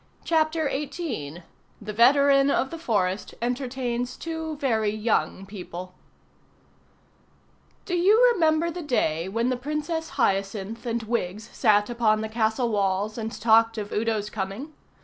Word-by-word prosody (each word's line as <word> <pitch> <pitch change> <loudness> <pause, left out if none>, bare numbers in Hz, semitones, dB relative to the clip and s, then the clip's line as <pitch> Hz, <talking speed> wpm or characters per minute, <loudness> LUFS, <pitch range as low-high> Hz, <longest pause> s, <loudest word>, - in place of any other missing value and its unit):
CHAPTER 315 -1 +1
XVIII 265 - -4 0.4
THE 210 0 -6
VETERAN 275 +4 +5
OF 265 -1 +1
THE 330 - -6
FOREST 205 - -1
ENTERTAINS 245 0 -2
TWO 320 -1 -4
VERY 225 -7 +1
YOUNG 215 -2 -1
PEOPLE 185 -2 -8 1.9
Do 360 - -2
you 420 +8 +5
remember 325 -3 +2
the 350 +2 -6
day 185 - 0
when 230 +5 0
the 255 - 0
Princess 300 +4 -3
Hyacinth 200 +1 -1
and 230 0 -1
Wiggs 220 -1 -3
sat 210 -3 +3
upon 225 -3 +1
the 220 - -4
castle 220 +2 0
walls 200 0 0
and 220 0 -3
talked 225 0 +4
of 205 -1 -5
Udo's 215 -1 -1
coming? 210 +10 -5
235 Hz, 130 wpm, -25 LUFS, 210-285 Hz, 1.9 s, VETERAN